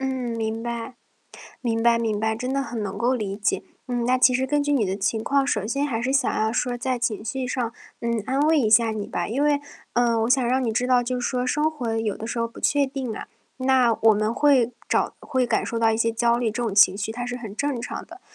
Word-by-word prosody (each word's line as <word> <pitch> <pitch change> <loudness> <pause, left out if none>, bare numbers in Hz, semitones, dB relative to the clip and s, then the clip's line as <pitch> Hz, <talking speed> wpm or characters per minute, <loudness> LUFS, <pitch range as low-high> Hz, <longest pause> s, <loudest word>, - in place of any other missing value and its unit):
嗯， 265 - -1 0.3
明 225 0 -2
白。 235 +1 -5 0.7
明 225 -2 -1
白 235 0 +4
明 220 -3 -1
白， 220 +1 0
真 250 +3 -3
的 275 - +1
很 235 -5 -4
能 195 -2 -4
够 245 +2 +2
理 200 -4 -3
解。 210 +1 0 0.2
嗯。 245 -1 -1
那 255 +1 +2
其 250 0 +5
实 260 +1 +1
根 290 +2 +1
据 290 - 0
你 255 -7 +2
的 190 +1 -2
情 215 +2 -1
况， 275 +3 +1
首 210 -7 0
先 275 +6 -1
还 235 -4 -2
是 260 +2 0
想 275 - +2
要 220 +1 +1
说 245 0 -1
在 250 +1 -2
情 225 -2 -2
绪 255 +3 -3
上， 245 -2 -2 0.3
嗯， 235 -1 -1
安 265 +2 0
慰 310 +2 +4
一 235 -6 +2
下 225 +1 +5
你 215 -2 -4
吧。 175 - -3
因 275 +6 0
为， 290 -1 +2 0.3
呃， 235 -2 +2
我 230 - 0
想 260 -1 +4
让 255 +2 +1
你 225 - 0
知 245 +3 0
道， 250 -1 +4
就 250 +1 -2
是 - - -1
说 250 -1 -1
生 300 +4 +1
活 240 -7 -3
有 220 -3 -1
的 225 - -6
时 235 - -3
候 230 - 0
不 - - -14
确 285 -1 +2
定 265 -4 -4
啊， - - -7 0.3
那 255 -3 +3
我 220 -1 +6
们 215 +2 0
会 265 -5 +3 0.2
找 - - +1
会 260 -2 0
感 - - +1
受 230 - -3
到 225 -1 +3
一 - - 0
些 230 0 +1
焦 235 +1 +2
虑， 240 -2 0
这 235 - -4
种 225 -4 -1
情 195 -1 +6
绪 220 +2 -3
它 245 +1 -4
是 245 0 -4
很 220 -5 -8
正 285 -1 -2
常 - - -5
的。 350 +3 -14
240 Hz, 285 characters per minute, -24 LUFS, 225-260 Hz, 0.7 s, 我